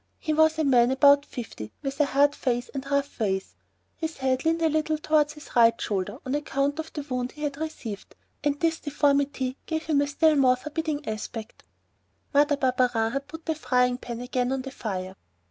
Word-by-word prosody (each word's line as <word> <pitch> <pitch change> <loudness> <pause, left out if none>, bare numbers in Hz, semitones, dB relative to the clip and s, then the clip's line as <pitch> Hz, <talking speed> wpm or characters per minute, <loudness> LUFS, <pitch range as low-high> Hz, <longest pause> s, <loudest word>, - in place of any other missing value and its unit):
He 310 - -2
was 315 +1 +4
a 315 - +1
man 245 -4 +4
about 280 +2 +5
fifty 110 - -7
with 275 +1 -4
a - - +5
hard 285 +1 +3
face 245 -3 -1
and 275 0 -5
rough 280 0 -1
ways. 190 -3 -1 0.4
His 320 -1 -4
head 260 -1 0
leaned 330 +1 +2
a - - +5
little 310 0 +1
bit 305 - -9
towards 300 -1 +3
his 300 - -13
right 230 -1 +5
shoulder, 205 +2 -2
on 260 - -2
account 285 0 -1
of 320 0 -5
the 295 - -5
wound 255 -3 -3
he 300 - -8
had 285 -1 -2
received, 275 -10 -6 0.3
and 290 0 0
this 330 -1 +1
deformity 280 -2 0
gave 320 -1 -2
him 300 -3 +2
a 285 - +1
still 310 +2 +3
more 260 -3 +5
forbidding 300 +2 -4
aspect. 220 0 -6 0.7
Mother 290 0 +4
Barberin 250 -4 +1
had 275 +2 -3
put 320 +2 -10
the 320 - 0
frying 250 -4 +1
pan 240 -1 -6
again 250 0 -1
on 265 -1 -1
the 270 - -7
fire. 190 -6 -5
280 Hz, 200 wpm, -26 LUFS, 250-300 Hz, 0.7 s, about